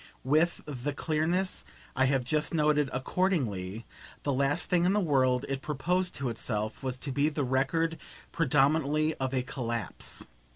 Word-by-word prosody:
With 155 +6 +2
the 145 0 -4
clearness 170 +5 0 0.3
I 130 - +3
have 130 -2 +1
just 150 +4 0
noted, 150 -2 +3
accordingly, 125 - -1 0.4
the 140 - 0
last 140 +5 +1
thing 175 -1 +2
in 185 - +3
the 210 - +3
world 130 -7 +2
it 135 -1 -3
proposed 180 +6 -1
to 135 -3 -2
itself 110 -2 -2
was 130 -2 -2
to 135 +2 -4
be 145 +3 +2
the 150 -1 -2
record 145 +6 +1 0.3
predominantly 155 0 +2
of 130 -1 -2
a 130 -2 0
collapse. 120 -3 -3
140 Hz, 155 wpm, -29 LUFS, 130-160 Hz, 0.4 s, I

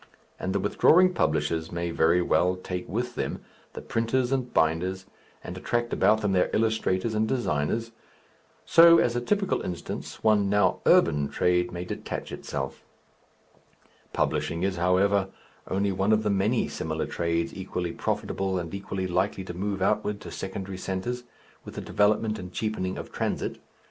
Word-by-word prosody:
And 95 - -2
the 100 - 0
withdrawing 180 - +4
publishers 80 - 0
may 85 0 -2
very 85 +2 +3
well 90 +1 +2
take 90 -1 -6
with 120 +6 -2
them - - -3 0.3
the - - -8
printers 120 +3 0
and 130 -2 -1
binders, 85 +4 +1 0.4
and - - -6
attract 120 0 -1
about 105 +3 +3
them 105 -2 0
their 90 -1 +2
illustrators 110 -1 +1
and 110 0 +1
designers.... 115 - -1 0.7
So, 170 0 +8
as 120 -6 +2
a 120 - 0
typical 195 +9 0
instance, 90 -2 -6
one 105 -2 +3
now 105 +1 +2
urban 75 -1 +4
trade 90 0 +1
may 90 0 -5
detach - - -5
itself. 70 0 -5 1.3
Publishing 75 +3 -1
is, 95 -2 0
however, 95 +3 +2 0.4
only 100 +1 0
one 95 +3 +1
of 110 0 +2
the 105 - +1
many 100 +5 +1
similar 80 0 -3
trades 85 0 -1
equally 90 -2 -4
profitable 95 +2 -2
and 85 -1 -5
equally 100 -1 -4
likely 95 +2 0
to 90 - -7
move 95 +1 -2
outward 105 +1 0
to - - -8
secondary 95 0 -5
centres, 120 +7 -3 0.4
with - - -10
the - - -4
development 105 +1 +1
and 90 0 -8
cheapening 95 -2 -2
of - - -7
transit. - - -2
95 Hz, 155 wpm, -27 LUFS, 90-110 Hz, 1.3 s, So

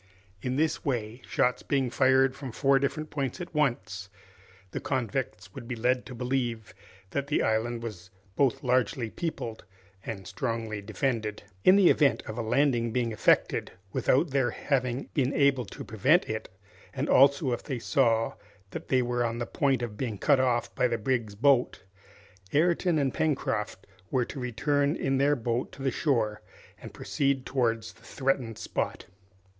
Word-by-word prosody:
In 125 +4 -2
this 155 +3 0
way, 120 -3 -2
shots 125 - +1
being 135 -3 0
fired 130 0 +4
from 135 -2 -7
four 135 +3 +3
different 155 +3 -2
points 140 +2 -3
at 175 - -7
once, 100 -10 -1 0.6
the - - -3
convicts 125 -8 -3
would 115 - -9
be 125 - -3
led 125 +2 0
to 125 - -8
believe 120 -3 -2 0.4
that 140 0 -2
the 150 - +1
island 115 +2 0
was 95 -6 -7 0.3
both 135 -2 +1
largely 125 -1 +1
peopled 155 -10 -4 0.4
and 100 -4 -6
strongly 110 +2 -3
defended. 110 0 -2 0.2
In 185 - +7
the 195 -3 +6
event 135 -7 +3
of 110 - -6
a 120 - -2
landing 120 0 +2
being 120 -1 0
effected 110 - +2 0.2
without 140 +4 +2
their 130 -3 +2
having 130 0 -1
been 135 -2 +1
able 140 -4 +3
to 95 - -9
prevent 140 - +2
it, 110 0 -4 0.5
and - - -1
also 140 0 +5
if 120 - -2
they 130 - -4
saw 115 -2 +2 0.4
that - - -7
they 130 -1 +3
were 120 0 0
on 115 0 -1
the 120 - -2
point 135 -3 0
of 110 -3 -5
being 115 -5 -3
cut 140 +6 +3
off 125 -2 +1
by 125 - +2
the 120 -1 -1
brig's 115 -2 -1
boat, 125 0 +2 0.7
Ayrton 170 +2 +3
and 140 -3 +1
Pencroft 110 -10 -1 0.2
were 125 -2 +1
to 135 - -7
return 140 +4 0
in 135 -5 0
their 145 +2 +4
boat 120 0 -2
to 135 - -9
the 135 - +1
shore 115 -8 0 0.4
and - - -9
proceed 135 -2 -1
towards 115 -4 -1
the - - -23
threatened 130 -5 -1
spot. - - -3
125 Hz, 165 wpm, -28 LUFS, 115-140 Hz, 0.7 s, In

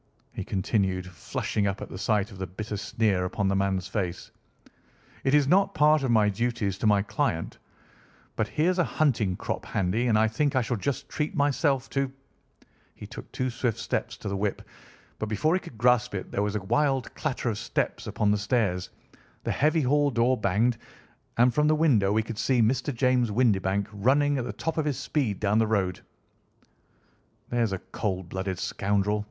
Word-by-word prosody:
he - - -4
continued, 95 -1 0
flushing 95 +3 -2
up 95 0 -2
at - - -6
the - - -8
sight 105 +1 +1
of 95 - -11
the 95 - -3
bitter 105 +4 -5
sneer 100 -1 0
upon 100 +2 -1
the 100 - +1
man's 95 -1 0
face, 95 -3 -3 0.9
"it 135 +2 +3
is 145 -2 +4
not 195 +5 +3
part 150 0 +5
of 135 - -1
my 110 -3 +4
duties 105 -2 -1
to 110 - +1
my 100 -1 +4
client, - - -2 0.8
but - - 0
here's 180 +4 +1
a - - +5
hunting 115 - +1
crop - - -4
handy, 100 +6 0
and 110 -3 +3
I 110 +1 +4
think 140 +6 0
I 130 - +3
shall 120 +2 -1
just 140 +5 -3
treat 150 0 -3
myself 140 -2 +1
to—" 135 -1 0 0.8
He - - -9
took - - -10
two 130 0 -2
swift 120 -2 -1
steps - - -3
to - - -7
the 100 - -2
whip, 100 0 -2 0.6
but 110 - -3
before 130 - +1
he 185 - +2
could 120 - -12
grasp 120 -2 +3
it 95 - -5
there - - -1
was 105 0 -1
a 105 - -1
wild 135 +4 +1
clatter 130 -5 -2
of 105 - -5
steps 120 - -2
upon 105 -1 +1
the 105 - +1
stairs, 100 -5 0 0.5
the - - -1
heavy 155 +3 +2
hall 145 +2 +3
door 125 0 +2
banged, 110 +3 +1 0.6
and 120 +1 +4
from 150 +4 +3
the 155 - +4
window 125 -11 +3
we 110 +1 +2
could 110 0 -6
see 130 0 +2
Mr. 125 +5 +2
James 125 -1 +2
Windibank 100 -4 +1
running 140 +7 +2
at 120 - -3
the 125 - -3
top 160 0 -3
of 155 - 0
his 145 -4 -1
speed 125 -10 -1
down 105 +1 +2
the 110 - +3
road. 95 -4 0 1.5
"There's 120 -3 +1
a 95 - -1 0.2
cold 95 -4 -2
blooded 95 0 -3
scoundrel!" 100 +2 0
110 Hz, 190 wpm, -27 LUFS, 100-135 Hz, 1.5 s, part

